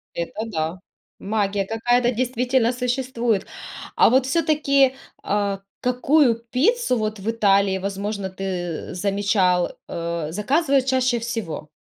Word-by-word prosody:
Это 185 Hz, +6 st, -4 dB
да, 165 Hz, -4 st, -3 dB, 0.4 s
магия 200 Hz, -1 st, -1 dB
какая-то 240 Hz, +3 st, +1 dB
действительно 250 Hz, 0 st, +1 dB
существует. 245 Hz, -4 st, -1 dB, 0.5 s
А -, -, +6 dB
вот 260 Hz, +2 st, +3 dB
все-таки, 280 Hz, -2 st, +2 dB, 0.3 s
а, 200 Hz, -1 st, -1 dB, 0.2 s
какую 250 Hz, +1 st, +3 dB, 0.2 s
пиццу 355 Hz, -, +2 dB
вот 215 Hz, -1 st, -2 dB
в 200 Hz, +3 st, -3 dB
Италии, 200 Hz, -3 st, +3 dB
возможно, 200 Hz, +1 st, -3 dB
ты, 185 Hz, -3 st, -4 dB
замечал, 195 Hz, -1 st, +1 dB
э, 170 Hz, -2 st, -4 dB
заказывают 270 Hz, -, +1 dB
чаще 255 Hz, -2 st, +1 dB
всего? 225 Hz, -10 st, -5 dB
220 Hz, 110 wpm, -22 LUFS, 195-255 Hz, 0.5 s, А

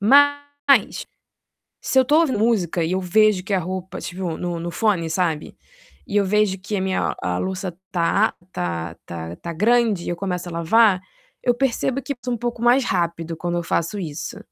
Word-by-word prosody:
mas 285 Hz, +1 st, +3 dB, 0.7 s
se 265 Hz, -, +1 dB
eu 260 Hz, -, +6 dB
tô 300 Hz, +5 st, +4 dB
ouvindo 295 Hz, -9 st, +1 dB
música 190 Hz, -7 st, +1 dB
e 165 Hz, -, -1 dB
eu 190 Hz, -, +1 dB
vejo 190 Hz, +1 st, +3 dB
que 200 Hz, -, -1 dB
a -, -, +3 dB
roupa 185 Hz, +1 st, -5 dB
tipo 180 Hz, -3 st, -4 dB
no 175 Hz, -1 st, -3 dB
no 170 Hz, +1 st, -4 dB
fone, 195 Hz, -7 st, +1 dB
sabe, 160 Hz, -2 st, -1 dB, 0.5 s
e -, -, -3 dB
eu 205 Hz, -, +4 dB
vejo 200 Hz, 0 st, +2 dB
que 200 Hz, +3 st, -4 dB
a -, -, -1 dB
minha 190 Hz, 0 st, 0 dB
a 90 Hz, 0 st, -1 dB
louça 185 Hz, -, -3 dB, 0.2 s
tá 185 Hz, +5 st, +2 dB, 0.2 s
tá 85 Hz, -1 st, -3 dB
tá 85 Hz, 0 st, -6 dB
tá 170 Hz, -, -6 dB
grande 215 Hz, 0 st, +2 dB
e -, -, -3 dB
eu 175 Hz, -, -2 dB
começo 180 Hz, -1 st, -3 dB
a -, -, -7 dB
lavar, 185 Hz, +4 st, +4 dB, 0.4 s
eu 245 Hz, -, +3 dB
percebo 265 Hz, +1 st, 0 dB
que 280 Hz, -, -3 dB
sou 250 Hz, -1 st, -1 dB
um -, -, -5 dB
pouco 240 Hz, 0 st, -3 dB
mais 245 Hz, +2 st, +5 dB
rápido 170 Hz, -4 st, -1 dB
quando 175 Hz, +1 st, -2 dB
eu -, -, -2 dB
faço 170 Hz, +3 st, -1 dB
isso. 155 Hz, -5 st, -5 dB
190 Hz, 195 wpm, -22 LUFS, 170-230 Hz, 0.7 s, eu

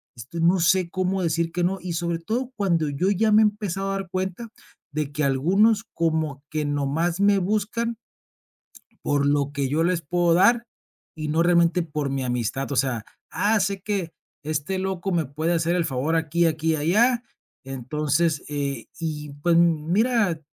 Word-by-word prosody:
este, 125 Hz, +9 st, -8 dB
no 175 Hz, +3 st, +4 dB
sé 180 Hz, +1 st, +3 dB
cómo 185 Hz, 0 st, -1 dB
decir, 165 Hz, 0 st, 0 dB
que 175 Hz, +1 st, -1 dB
no. 190 Hz, +2 st, -1 dB
Y 180 Hz, -, -5 dB
sobre 170 Hz, 0 st, -2 dB
todo 240 Hz, +9 st, -3 dB
cuando 170 Hz, -6 st, +1 dB
yo 145 Hz, +7 st, 0 dB
ya 215 Hz, +2 st, +2 dB
me 215 Hz, -, +7 dB
he -, -, +6 dB
empezado 200 Hz, -2 st, -2 dB
a -, -, -1 dB
dar 195 Hz, -2 st, -5 dB
cuenta 190 Hz, +5 st, -3 dB, 0.5 s
de 150 Hz, -1 st, -2 dB
que 150 Hz, +1 st, -2 dB
algunos 195 Hz, +11 st, +3 dB
como 160 Hz, -4 st, -1 dB
que 155 Hz, -1 st, -2 dB
nomás 145 Hz, +5 st, -1 dB
me 200 Hz, -1 st, +4 dB
buscan 215 Hz, +4 st, -1 dB, 1.1 s
por 145 Hz, -1 st, +1 dB
lo 145 Hz, 0 st, +1 dB
que 140 Hz, -2 st, -1 dB
yo 155 Hz, +4 st, +1 dB
les 175 Hz, 0 st, +1 dB
puedo 175 Hz, +2 st, +1 dB
dar 235 Hz, +7 st, +4 dB, 0.5 s
y 155 Hz, -1 st, -4 dB
no 160 Hz, +2 st, +2 dB
realmente 170 Hz, 0 st, +3 dB
por 150 Hz, -3 st, -3 dB
mi 135 Hz, -1 st, -2 dB
amistad. 125 Hz, +2 st, -2 dB
O -, -, -1 dB
sea: 125 Hz, -4 st, 0 dB, 0.3 s
"Ah, 215 Hz, +1 st, +2 dB
sé 195 Hz, 0 st, -1 dB
que, 195 Hz, -5 st, -3 dB, 0.3 s
este 155 Hz, +5 st, -2 dB
loco 190 Hz, 0 st, -2 dB
me 170 Hz, -3 st, +1 dB
puede 155 Hz, +5 st, -1 dB
hacer 170 Hz, +1 st, +1 dB
el 175 Hz, -2 st, +1 dB
favor 140 Hz, +4 st, -1 dB
aquí, 165 Hz, +1 st, +1 dB
aquí 160 Hz, 0 st, +1 dB
y -, -, +1 dB
allá, 225 Hz, +11 st, +2 dB, 0.4 s
entonces, 145 Hz, +4 st, -1 dB
eh". 140 Hz, -5 st, -3 dB
Y 150 Hz, -3 st, -4 dB
pues 170 Hz, 0 st, +3 dB
m 165 Hz, -3 st, +3 dB
mira, 215 Hz, -5 st, +2 dB
170 Hz, 180 wpm, -24 LUFS, 150-190 Hz, 1.1 s, me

